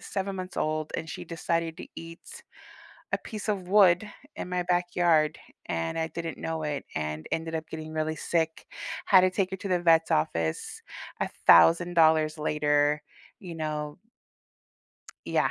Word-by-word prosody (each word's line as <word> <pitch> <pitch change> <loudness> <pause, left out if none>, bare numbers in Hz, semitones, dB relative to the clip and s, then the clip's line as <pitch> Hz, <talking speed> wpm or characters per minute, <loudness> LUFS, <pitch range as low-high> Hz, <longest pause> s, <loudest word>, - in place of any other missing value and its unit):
7 195 0 -3
months 185 0 -6
old, 155 0 -1
and 160 - -5
she - - -6
decided 165 -1 -2
to - - -8
eat 165 - -10 0.7
a - - +2
piece 215 -2 -7
of 190 -4 -2
wood 195 0 +5 0.3
in - - -5
my 180 0 -1
backyard, 175 -3 +2 0.3
and 80 - -2
I 160 - 0
didn't 165 -1 -5
know 160 -1 -3
it 145 -2 -3
and 75 0 -3
ended 160 0 -2
up 160 0 -4
getting 155 0 -7
really 155 0 -1
sick, 160 -1 -1 0.4
had 185 -2 +7
to 185 - +4
take 185 0 -1
her 190 - -3
to 200 - -5
the 180 -1 +1
vet's 165 -1 +4
office 80 +1 -1 0.4
$1,000 155 - +4
later, 150 0 +1 0.4
you 175 -4 -8
know? 150 -1 -4 1.3
Yeah, - - +2
160 Hz, 150 wpm, -28 LUFS, 155-180 Hz, 1.3 s, had